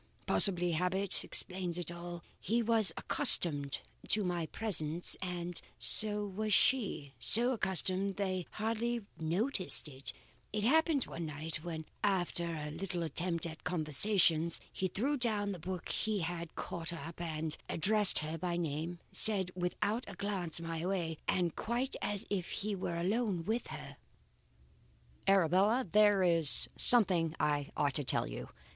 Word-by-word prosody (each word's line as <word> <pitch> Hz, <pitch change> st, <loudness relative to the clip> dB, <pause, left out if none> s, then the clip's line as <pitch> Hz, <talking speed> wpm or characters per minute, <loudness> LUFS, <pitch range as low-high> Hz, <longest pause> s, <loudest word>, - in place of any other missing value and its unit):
Possibly 180 Hz, -3 st, +3 dB
habit 180 Hz, +4 st, 0 dB
explains 180 Hz, -2 st, -2 dB
all. 175 Hz, 0 st, -8 dB, 0.2 s
He 230 Hz, +5 st, -1 dB
was 225 Hz, -2 st, +5 dB
accustomed 145 Hz, -5 st, +3 dB, 0.3 s
to 210 Hz, -, +2 dB
my 175 Hz, -3 st, -2 dB
presence 170 Hz, -5 st, +3 dB
and 175 Hz, -2 st, -5 dB, 0.2 s
so 210 Hz, -1 st, +5 dB
was 205 Hz, +1 st, -1 dB
she; 200 Hz, -, +1 dB
so 240 Hz, +3 st, +5 dB
accustomed 190 Hz, -3 st, +1 dB
they 185 Hz, -3 st, -3 dB
hardly 230 Hz, +2 st, -2 dB, 0.2 s
noticed 185 Hz, -, 0 dB
it, 135 Hz, -2 st, -6 dB, 0.4 s
as 210 Hz, -, -1 dB
happened 310 Hz, +2 st, +2 dB
one 165 Hz, -1 st, -7 dB
night, 155 Hz, +2 st, -5 dB
when 160 Hz, -2 st, -6 dB, 0.2 s
after 175 Hz, -4 st, -1 dB
a 150 Hz, -1 st, -6 dB
little 175 Hz, +1 st, -4 dB
attempt 170 Hz, +1 st, -3 dB
at 160 Hz, -1 st, -8 dB
conversation, 165 Hz, +1 st, +1 dB, 0.2 s
he 185 Hz, -, -2 dB
threw 265 Hz, +11 st, -2 dB
down 215 Hz, -5 st, -1 dB
the 185 Hz, -, -7 dB
book 180 Hz, +1 st, -6 dB
he 215 Hz, -3 st, -1 dB
had 170 Hz, 0 st, -5 dB
caught 170 Hz, -1 st, -5 dB
up 165 Hz, +1 st, -8 dB
and, 160 Hz, -2 st, -4 dB
addressing 195 Hz, -2 st, +4 dB
her 160 Hz, +1 st, -5 dB
by 175 Hz, 0 st, -3 dB
name, 165 Hz, +1 st, -4 dB
said 195 Hz, -4 st, +3 dB
without 185 Hz, +6 st, -2 dB
a 200 Hz, -, -9 dB
glance 185 Hz, -5 st, -2 dB
my 165 Hz, -1 st, -5 dB
way, 175 Hz, -4 st, -3 dB
and 175 Hz, -3 st, 0 dB
quite 240 Hz, +4 st, -2 dB
as 205 Hz, +1 st, -3 dB
if 185 Hz, -4 st, -2 dB
he 210 Hz, +1 st, -3 dB
were 180 Hz, -3 st, -4 dB
alone 195 Hz, -2 st, -1 dB
with 225 Hz, +4 st, -2 dB
her: -, -, -10 dB, 1.3 s
"'Arabella, 195 Hz, +6 st, +3 dB
there 205 Hz, -2 st, +4 dB
is 165 Hz, -4 st, +3 dB
something 180 Hz, -9 st, +5 dB
I 145 Hz, -1 st, -1 dB
ought 145 Hz, -2 st, 0 dB
to 145 Hz, -, -2 dB
tell 130 Hz, -, 0 dB
you. -, -, -8 dB
180 Hz, 145 wpm, -32 LUFS, 165-205 Hz, 1.3 s, was